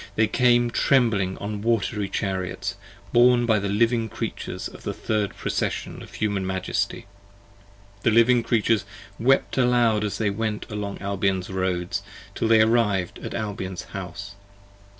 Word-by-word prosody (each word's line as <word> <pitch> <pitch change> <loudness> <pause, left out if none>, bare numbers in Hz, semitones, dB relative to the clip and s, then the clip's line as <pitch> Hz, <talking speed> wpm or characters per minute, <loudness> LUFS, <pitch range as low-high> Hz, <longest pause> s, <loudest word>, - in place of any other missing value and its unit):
they 110 - +4
came 120 +1 +3
trembling 115 -9 +2
on 100 0 -5
wat'ry 105 -2 0
chariots, 95 -3 -2 0.4
Borne 120 0 +5
by 110 -3 +3
the 100 0 -2
Living 115 +2 +2
Creatures - - -5
of - - -13
the - - -4
third 105 -3 -1
procession - - -3
Of - - -12
Human 100 -2 -1
Majesty: 95 0 -2 1.0
the - - +3
Living 115 +2 +5
Creatures 115 -3 +1 0.4
wept 135 +2 +2
aloud 120 -4 +3
as 105 - -2
they 105 -2 0
Went 105 +1 -2
along 105 -1 -4
Albion's 100 -2 -1
roads, 95 -2 -1 0.3
till - - -1
they 110 -1 +6
arriv'd 110 -5 +2
at - - -6
Albion's 95 -4 -4
House. 100 +1 -6
105 Hz, 140 wpm, -24 LUFS, 100-115 Hz, 1.0 s, they